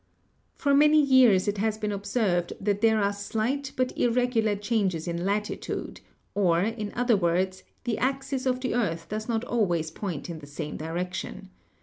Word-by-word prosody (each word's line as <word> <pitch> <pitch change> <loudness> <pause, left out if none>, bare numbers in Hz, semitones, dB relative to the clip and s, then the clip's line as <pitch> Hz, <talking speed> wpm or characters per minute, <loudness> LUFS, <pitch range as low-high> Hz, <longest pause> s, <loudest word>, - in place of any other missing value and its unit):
For 285 -1 +1
many 300 +2 +6
years 260 -10 +5
it 205 0 -1
has 215 +1 0
been 210 -1 -2
observed 200 -3 0
that 200 0 0
there 220 -1 +4
are 200 0 +1
slight 230 +7 -2
but 255 0 -1
irregular 235 -3 +2
changes 200 -6 -1
in 170 0 -2
latitude, 210 +2 -3 0.3
or, 175 -4 +3
in 215 -1 -3
other 245 -1 +3
words, 185 +1 0 0.2
the 240 -3 -1
axis 270 0 -1
of 255 0 0
the 255 - -1
earth 170 -9 -1
does 215 +2 -4
not 225 0 0
always 175 -10 0
point 170 -4 -5
in 170 -2 -6
the 145 - -12
same 150 +1 -5
direction. 180 +4 -5
210 Hz, 165 wpm, -27 LUFS, 185-245 Hz, 0.3 s, many